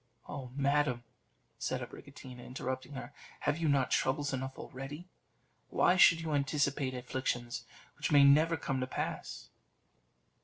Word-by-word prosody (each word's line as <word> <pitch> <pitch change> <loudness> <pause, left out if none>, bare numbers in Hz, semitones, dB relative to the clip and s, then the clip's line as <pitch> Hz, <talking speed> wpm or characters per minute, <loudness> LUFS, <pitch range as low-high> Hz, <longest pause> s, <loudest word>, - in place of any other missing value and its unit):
"Oh! 130 -3 -6
madam," 140 -3 +1 0.6
said - - -1
Abricotina, 130 -3 -10
interrupting 130 +2 -5
her, 130 - -7 0.3
"have 145 +2 0
you 160 -2 +1
not 135 -2 +2
troubles 140 +1 +1
enough 130 0 -4
already? 140 +6 -7 0.6
Why 180 - +4
should 165 -2 +7
you 160 -2 -2
anticipate 140 -1 0
afflictions 125 -1 -3 0.3
which - - -2
may 145 -1 +7
never 155 +4 +5
come 135 -3 -2
to 130 - -2
pass?" - - -4
135 Hz, 130 wpm, -33 LUFS, 130-145 Hz, 0.6 s, should